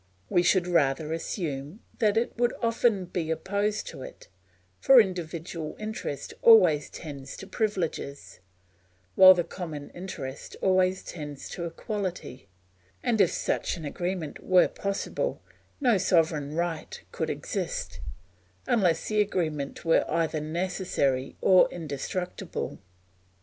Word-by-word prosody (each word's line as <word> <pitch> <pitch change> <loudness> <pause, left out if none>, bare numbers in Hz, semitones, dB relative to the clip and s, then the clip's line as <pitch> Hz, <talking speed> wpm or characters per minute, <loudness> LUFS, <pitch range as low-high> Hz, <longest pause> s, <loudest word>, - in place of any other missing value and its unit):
We 175 - +4
should 175 +1 +3
rather 155 -3 +1
assume 160 - -4 0.2
that 215 -2 +3
it 230 - 0
will 240 +1 +2
often 230 -4 +2
be 175 -2 -3
opposed 200 +6 -1
to - - -9
it; - - -11 0.5
for 270 -2 +7
individual 170 -5 -2
interest 215 -10 -5
always 180 -10 +6
tends 140 -4 -8
to - - -8
privileges, 185 -9 -3 0.7
while 185 0 +9
the 175 - +1
common 160 -6 -7
interest 150 -7 -7
always 185 0 +2
tends 150 -4 -7
to 170 - -5
equality, 175 - -5 0.5
and 225 -3 +2
if 180 - +4
such - - -1
an 160 - -7
agreement 175 0 -4
were 185 -1 +5
possible, 200 - -3 0.4
no 245 -8 +3
sovereign 155 -5 +1
right 170 -2 -3
could - - -2
exist, - - -4 0.7
unless 180 -8 +2
the 215 -1 +2
agreement 155 -9 -2
were 165 - +4
either 160 -1 0
necessary 155 -5 -1
or 185 -1 +6
indestructible. 170 +3 -5
175 Hz, 120 wpm, -27 LUFS, 155-195 Hz, 0.7 s, while